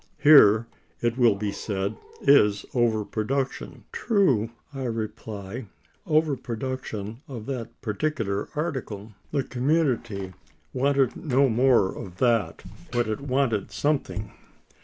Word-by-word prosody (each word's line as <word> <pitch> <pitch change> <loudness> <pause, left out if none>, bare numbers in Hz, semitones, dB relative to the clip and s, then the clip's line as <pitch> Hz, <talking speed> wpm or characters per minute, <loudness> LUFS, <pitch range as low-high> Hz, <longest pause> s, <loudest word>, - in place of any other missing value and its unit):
Here, 115 -7 +7 0.3
it 120 -1 0
will 120 -5 +4
be 100 0 -2
said, 100 0 -3 0.3
is 105 -8 +4
over 115 -4 +2
production. 130 +6 -3
True, 140 - +2 0.2
I 135 -1 -4
reply; 110 -1 -5 0.4
over 155 -2 +3
production 115 -3 -5
of 120 -7 -7
that 120 -3 -6
particular 110 -3 -2
article. 130 -10 -4 0.2
The 140 -2 0
community 120 - 0 0.4
wanted 135 -1 +2
no 135 -2 +2
more 120 -4 +3
of 90 -2 -8
that, 115 -7 +1 0.3
but 120 -1 +1
it 110 +3 -3
wanted 130 -6 0
something. 140 -8 -1
120 Hz, 115 wpm, -26 LUFS, 105-135 Hz, 0.4 s, Here